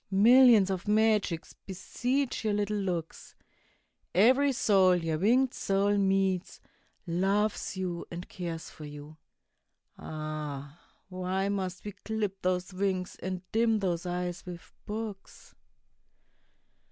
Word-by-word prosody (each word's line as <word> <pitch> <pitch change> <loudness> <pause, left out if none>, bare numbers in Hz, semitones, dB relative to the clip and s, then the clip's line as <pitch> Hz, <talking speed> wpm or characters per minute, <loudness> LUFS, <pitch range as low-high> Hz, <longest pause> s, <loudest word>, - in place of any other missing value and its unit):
Millions 220 0 +6
of 190 +1 -4
magics 210 -5 +1
beseech 245 +9 -2
your 215 -1 +1
little 210 0 -1
looks; 180 -5 -4 0.8
Every 260 +9 +5
soul 195 -7 +4
your 165 -3 -1
winged 245 +7 +3
soul 200 +1 +1
meets, 195 -2 +1 0.5
loves 195 +4 0
you 180 -2 -4
and 175 +1 -7
cares 170 -3 -6
for 155 - -10
you. 150 +1 -10 0.8
Ah! 155 -1 -6 0.3
why 185 +1 -2
must 190 -2 -3
we 205 - -4
clip 210 -2 -4
those 180 +1 -1
wings 185 -1 -1
and 185 -1 -4
dim 225 0 +3
those 180 -3 -2
eyes 180 0 -3
with 175 -1 -10
books? 210 -2 -7
190 Hz, 115 wpm, -29 LUFS, 175-210 Hz, 0.8 s, Millions